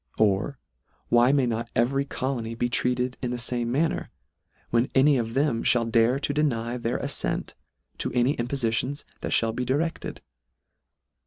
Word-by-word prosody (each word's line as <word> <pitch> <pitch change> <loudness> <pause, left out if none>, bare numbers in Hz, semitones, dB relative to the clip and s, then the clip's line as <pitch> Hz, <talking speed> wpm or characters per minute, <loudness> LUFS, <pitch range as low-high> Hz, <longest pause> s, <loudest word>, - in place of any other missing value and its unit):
Or 110 +6 +1 0.5
why 120 +2 +5
may 140 -2 +3
not 115 0 -2
every 135 +4 +2
colony 125 -4 -3
be 120 +1 -1
treated 125 +1 0
in 125 - -2
the 125 - -2
fame 120 -1 -1
manner, 155 +6 0 0.6
when 120 +2 +2
any 140 +2 +5
of 115 -2 -2
them 135 -4 +1
(hall 120 -1 +3
dare 115 +3 +3
to 145 - 0
deny 125 -5 0
their 120 0 -1
afTent - - -1 0.5
to - - -2
any 125 +3 +2
impofitions 125 +2 -1 0.2
that - - -4
fhall 115 -1 +2
be 125 - -1
di 130 +2 +1
recled 165 +2 -3
125 Hz, 160 wpm, -26 LUFS, 115-135 Hz, 0.6 s, why